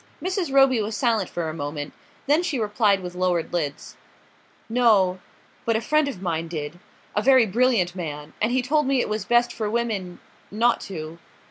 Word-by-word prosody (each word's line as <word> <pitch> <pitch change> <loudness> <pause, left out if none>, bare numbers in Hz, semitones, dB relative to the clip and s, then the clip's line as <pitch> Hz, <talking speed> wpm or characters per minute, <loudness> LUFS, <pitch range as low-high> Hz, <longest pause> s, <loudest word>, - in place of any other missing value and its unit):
Mrs. 370 -4 -2
Roby 270 -3 +5
was 210 0 -3
silent 220 -3 +1
for 170 -2 -3
a 155 - -4
moment; 145 -1 -5 0.3
then 295 +4 +3
she 315 -6 -2
replied 210 -3 +2
with 180 0 -6
lowered 180 -2 -1
lids: 150 -5 -3 0.7
"No 215 -6 +3 0.4
but 230 - +1
a - - +2
friend 305 +5 +1
of 195 -9 -6
mine 165 -2 -2
did; 160 0 -6 0.4
a 210 - +2
very 260 0 +5
brilliant 215 -4 +1
man; 150 -4 -6
and 220 - +2
he 255 0 +1
told 300 +2 +1
me 270 -1 +2
it - - -1
was 215 0 -2
best 240 0 +2
for 215 -2 -3
women 210 -6 -2 0.3
not 235 +3 +2
to...." 165 -3 -7
210 Hz, 180 wpm, -24 LUFS, 175-245 Hz, 0.7 s, Roby